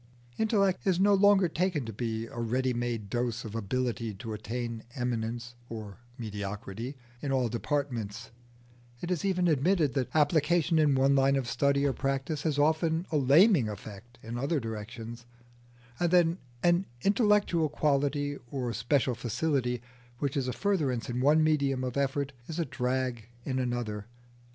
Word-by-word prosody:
Intellect 200 -4 +2
is 185 -2 +3
no 200 +1 +5
longer 200 -1 +5
taken 165 -4 -1
to 115 - -6
be 115 0 -3
a 115 - -8
ready 125 +3 0
made 120 -3 -2
dose 120 +2 -2
of 110 - -7
ability 115 0 -2
to 110 +3 -6
attain 115 +2 -4
eminence 120 -1 -3 0.2
(or 110 -3 -7 0.2
mediocrity) 105 +3 -5 0.3
in 140 - -2
all 130 -3 +1
departments; 120 -4 -3 0.7
it 175 - -3
is 175 - -1
even 180 -2 +2
admitted 155 -1 +2
that 130 -1 -1
application 160 +2 +3
in 150 -3 +4
one 135 +1 +4
line 135 0 +4
of 135 -3 -1
study 140 +3 +2
or 140 - +2
practice 135 +2 -2
has 150 -3 0
often 160 +3 +2
a 155 - +2
laming 145 - +5
effect 105 +3 -9
in 115 +2 -5
other 145 +4 0
directions, 115 +1 -7 0.7
and 175 - +2
that 180 -1 +6 0.4
an 175 +2 +3 0.2
intellectual 205 -6 +3
quality 145 -1 0
or 125 -3 -2
special 125 +3 +1
facility 125 0 -1 0.3
which 140 +1 -2
is 135 -3 0
a - - 0
furtherance 135 - 0
in 125 +1 -2
one 150 +4 +5
medium 140 -4 +1
of 125 -1 -3
effort 140 0 0
is 160 - -5
a 170 - 0
drag 125 -3 -2 0.2
in 130 -1 -1
another. 120 -4 -2
135 Hz, 155 wpm, -29 LUFS, 120-155 Hz, 0.7 s, that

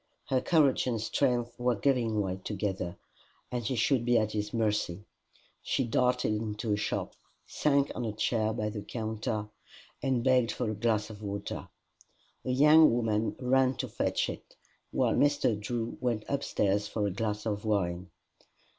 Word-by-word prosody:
Her 130 -1 +2
courage 150 -6 +3
and 120 -3 0
strength 120 +2 0
were 125 0 +2
giving 115 -1 +1
way 95 -1 -3
together, 95 -3 -3 0.5
and 120 -1 -2
she 130 +4 -1
should 125 +2 +2
be 120 0 +3
at 110 -1 +1
his 105 -1 -2
mercy. 105 -4 -1 0.6
She - - 0
darted 125 -1 +1
into 105 0 -2
a - - +3
shop, 105 0 -2 0.3
sank 140 -1 +1
on 120 - -3
a 110 - -1
chair 110 +1 0
by 105 -1 -2
the 105 -1 -5
counter, 110 -1 -3 0.5
and 130 -3 0
begged 125 -2 +3
for 120 -4 -2
a - - -4
glass 110 0 0
of 105 -1 -11
water. 100 -1 -5 0.8
A - - -4
young 150 +5 +7
woman 110 -2 0
ran 130 0 +3
to - - -3
fetch - - 0
it, - - -8 0.3
while - - +1
Mr. 145 -5 +3
Drew 115 +2 -3
went 120 -4 -1
upstairs 105 -7 0
for 105 -1 -1
a 100 - 0
glass 105 +2 -3
of 105 -2 -2
wine. 90 -4 -1
110 Hz, 165 wpm, -30 LUFS, 105-125 Hz, 0.8 s, young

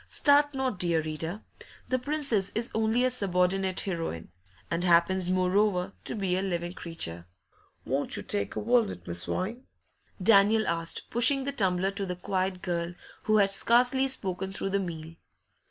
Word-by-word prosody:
Start 290 0 +3
not, 260 -7 -2
dear 170 -2 +1
reader; 160 +5 -5 0.4
the 255 - 0
Princess 270 -8 0
is 230 +2 -1
only 220 +2 +1
a - - +3
subordinate 190 -3 +1
heroine, 165 - -5 0.4
and 170 +1 -1
happens, 180 +1 +2
moreover, 185 +1 +1
to - - -2
be 190 -4 -1
a 185 - 0
living 175 -2 -3
creature. 85 - -5 0.6
'Won't - - -2
you - - -6
take 100 0 -2
a - - -2
walnut, 220 - 0
Miss 85 0 +3
Vine?' 230 +8 -4 0.5
Daniel 210 +2 +4
asked, 165 0 -2
pushing 255 +4 +4
the 280 - -3
tumbler 190 -6 0
to 200 -1 -4
the 180 - -3
quiet 185 0 -3
girl, 175 -1 -3 0.3
who 215 0 +3
had 200 -1 +3
scarcely 250 +6 +4
spoken 190 -7 -2
through 195 0 -3
the 200 - +1
meal. 165 -3 -6
190 Hz, 160 wpm, -28 LUFS, 175-225 Hz, 0.6 s, Daniel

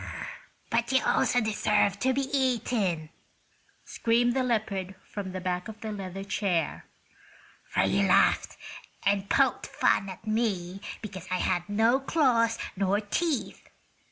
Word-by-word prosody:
"But 235 +1 +1
you 265 - +3
also 245 - +3
deserve 210 -2 +1
to 260 +4 +2
be 270 +1 -1
eaten," 220 - 0 0.7
screamed 240 +1 +1
the 265 - +2
leopard 210 -6 -1
from 200 -2 -6
the 185 - -4
back 180 0 -2
of 220 -1 -9
the 220 - -4
leather 195 -2 -6
chair; 195 -5 -1 0.8
"for - - +2
you 200 0 +2
laughed 185 - +3 0.5
and 200 0 +1
poked - - +2
fun 195 - +1
at 190 - -10
me 200 -4 -1 0.2
because 190 -3 -7
I 185 - 0
had 180 0 -1
no 225 +5 +3
claws 245 -6 +2 0.2
nor 195 +1 +1
teeth! 275 +7 -2
205 Hz, 135 wpm, -28 LUFS, 190-235 Hz, 0.8 s, you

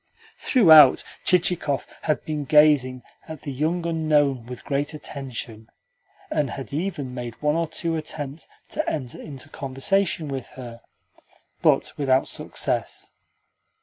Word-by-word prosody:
Throughout, 160 - +7 0.2
Chichikov 175 -5 +1 0.2
had 155 -2 -1
been 150 -2 -3
gazing 140 -4 +4 0.2
at 160 -3 -9
the 145 - -4
young 160 +6 -1
unknown 150 -7 +1
with 125 -1 -8
great 145 +2 -1
attention, 120 -6 -7 0.6
and 145 -3 0
had 135 +1 -7
even 150 -5 -3
made 120 -2 -6
one 150 0 +1
or 165 0 0
two 165 +1 -3
attempts 155 -1 -5 0.2
to - - -2
enter 130 -6 -4
into 140 -4 -8
conversation 155 +6 0
with 135 -3 -5
her: 120 -2 -9 0.8
but - - +2
without 135 -2 +2
success. - - -3
145 Hz, 125 wpm, -24 LUFS, 130-160 Hz, 0.8 s, Throughout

